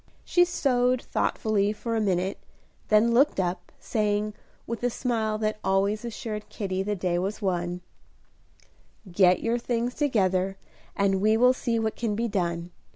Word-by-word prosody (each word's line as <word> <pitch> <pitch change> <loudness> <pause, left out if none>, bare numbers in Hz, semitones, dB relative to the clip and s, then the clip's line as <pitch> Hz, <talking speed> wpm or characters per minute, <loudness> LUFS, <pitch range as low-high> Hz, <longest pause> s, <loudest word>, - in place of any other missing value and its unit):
She 355 0 +4
sewed 255 -7 +1
thoughtfully 210 -2 0
for 230 +2 -3
a 220 - +1
minute, 190 -1 0 0.5
then 215 +2 +4
looked 265 -2 +3
up, 180 -1 -2
saying, 210 -1 -1 0.3
with 230 0 -5
the 245 - +1
smile 225 -3 -1
that 215 0 -2
always 200 +3 +1
assured 215 -2 -5
Kitty 190 -2 -3
the 205 +2 -1
day 180 -2 0
was 195 +4 -3
won, 180 -3 -2 1.3
"Get 180 0 +4
your 230 +1 +1
things 240 0 -1
together, 195 -9 +1 0.4
and 195 -1 +1
we 215 +2 +4
will 250 +2 +5
see 235 -2 -1
what 220 -1 -1
can 225 -3 -2
be 230 +2 0
done. 175 -4 -2
210 Hz, 155 wpm, -26 LUFS, 190-235 Hz, 1.3 s, will